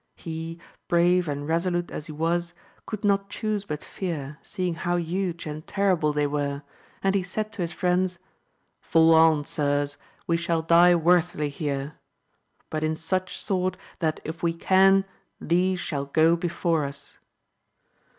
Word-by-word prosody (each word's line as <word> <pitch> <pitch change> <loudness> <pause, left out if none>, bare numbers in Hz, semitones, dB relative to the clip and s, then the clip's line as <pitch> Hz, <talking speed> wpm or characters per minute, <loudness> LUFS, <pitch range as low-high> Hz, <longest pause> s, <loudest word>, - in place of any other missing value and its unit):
He, 165 0 -6 0.3
brave 175 +1 +3
and 145 0 -3
resolute 175 +1 0
as 155 - -6
he - - -7
was, 170 +3 -1 0.3
conid 215 -1 -5
not 195 -1 +2
chuse 210 -1 -2
but 150 -5 -5
fear, 150 -6 -5
seeing 180 -4 -3
how 175 +1 -1
huge 175 0 -2
and 155 0 -6
terriUe 180 -7 +1
they 150 0 +2
were, 140 0 -2 0.4
and 195 0 +3
he 200 - +2
said 215 +4 -4
to 205 - -5
his 170 -1 -1
friends, 180 0 0 0.6
Fall 165 0 +4
on 160 -2 +5
sirs, 145 -1 -1 0.3
we 170 - +1
shall 170 -1 -1
die 170 +2 +6
worthily 170 -2 +2
here, 140 0 -4 0.7
but 155 0 -2
in 155 0 0
such 185 +4 -2
sort, 185 -2 -1 0.2
that 155 -2 0
if 160 +1 -6
we 170 -1 0
can, 195 +2 +4 0.3
these 180 +2 +1
shall 140 -5 -3
go 160 +4 +4
beJPore 170 -3 0
us. 140 0 -11
170 Hz, 150 wpm, -26 LUFS, 155-180 Hz, 0.7 s, die